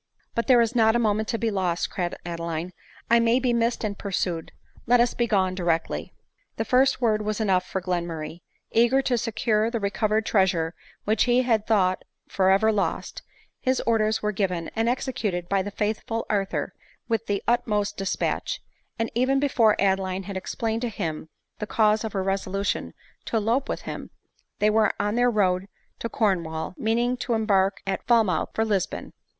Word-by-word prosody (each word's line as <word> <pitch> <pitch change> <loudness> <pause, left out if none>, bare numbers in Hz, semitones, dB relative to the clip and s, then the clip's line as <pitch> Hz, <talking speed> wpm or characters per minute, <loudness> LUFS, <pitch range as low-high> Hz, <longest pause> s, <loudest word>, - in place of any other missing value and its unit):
" - - -42
But 235 - -1
there 250 -3 +6
is 230 +1 +1
not 220 -1 +4
a 240 -1 +2
moment 215 +1 +1
to 230 - -1
be 225 -1 0
lost," 180 -3 -1
cried 175 -3 -2
Ade 170 -1 -4
line; 170 +1 -4 0.2
" - - -16
I 235 - +7
may 230 +2 +3
be 250 -2 +1
missed 235 0 0
and 205 -2 -2
pursued; 180 -5 -3 0.4
let 245 +1 +5
us 240 0 +3
be 240 - 0
gone 190 -4 +2
directly." 170 -3 -1 0.5
The - - -1
first 260 0 +3
word 215 -3 +2
was 210 +1 -2
enough 190 -4 +2
for 190 - -3
Glenmurray; 170 -2 -3 0.3
eager 240 +4 +4
to 250 - +1
secure 225 -1 0
the 230 -1 -2
recovered 215 +1 0
treasure 180 -6 +2 0.3
which 215 +1 +2
he 250 +1 +3
had 225 -4 +1
thought 185 -4 +2 0.2
for 190 -1 +2
ever 200 +3 +4
lost, 205 -2 -2 0.4
his 260 0 +1
orders 220 -2 +1
were 210 - +1
given, 180 -4 -2
and 225 +1 +1
executed 215 -9 -2
by 195 0 +1
the 195 - -4
faithful 215 +2 -2
Arthur 195 -2 -1 0.3
with 225 -1 -1
the 200 -1 -1
utmost 210 -3 +1
despatch; 195 - -2 0.4
and 230 0 -2
even 260 +3 +2
be 285 - +2
fore 220 -5 +4
Adeline 190 -1 +1
had 200 0 -7
explained 225 +4 -2
to 245 - -1
him 160 -6 -4 0.3
the 210 - -4
cause 215 0 +2
of 220 - -4
her 195 -2 -1
reso 195 -1 -1
lution 195 +1 -2 0.3
to 230 - -1
elope 230 +6 0
with - - -2
him, - - -7 0.5
they 210 +1 +3
were 220 0 +3
on 205 0 0
their 245 +1 +3
road 190 -4 +1 0.3
to 230 - -3
Corn 195 -7 +1
wall, 160 +1 -5
meaning 235 +3 +1
to 240 -1 -1
embark 200 -3 +2
at 195 -1 -3
Falmouth 225 -6 +3
for 220 - +1
Lisbon. 200 -4 -2
215 Hz, 190 wpm, -25 LUFS, 190-230 Hz, 0.5 s, I